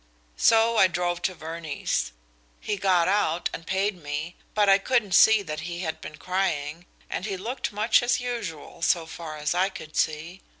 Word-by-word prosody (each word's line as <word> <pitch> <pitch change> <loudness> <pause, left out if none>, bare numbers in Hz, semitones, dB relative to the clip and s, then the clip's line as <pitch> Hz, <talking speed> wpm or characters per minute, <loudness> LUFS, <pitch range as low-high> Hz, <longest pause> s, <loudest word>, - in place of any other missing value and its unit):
So 230 0 +4
I 190 - +7
drove 175 -1 -2
to 185 - -1
Verney's. 160 - -3 0.5
He 210 - -2
got 185 -3 +2
out, 180 -4 +1
and 165 - -7
paid 190 -1 -1
me, 150 +4 -4 0.2
but 210 -1 +3
I 195 0 +6
couldn't 235 -2 +1
see 220 +3 +6
that 155 -4 -5
he 175 +1 -5
had 160 -3 -4
been 155 - -8
crying, 170 -3 -2 0.2
and 195 - -4
he 195 -2 -3
looked 235 +8 -4
much 215 +4 +3
as 245 +1 +1
usual, 230 -14 -5
so 170 -1 +2
far 160 -1 -8
as 150 +1 -1
I 185 +2 +2
could 155 -5 -10
see. 160 +4 -1
180 Hz, 180 wpm, -26 LUFS, 160-205 Hz, 0.5 s, I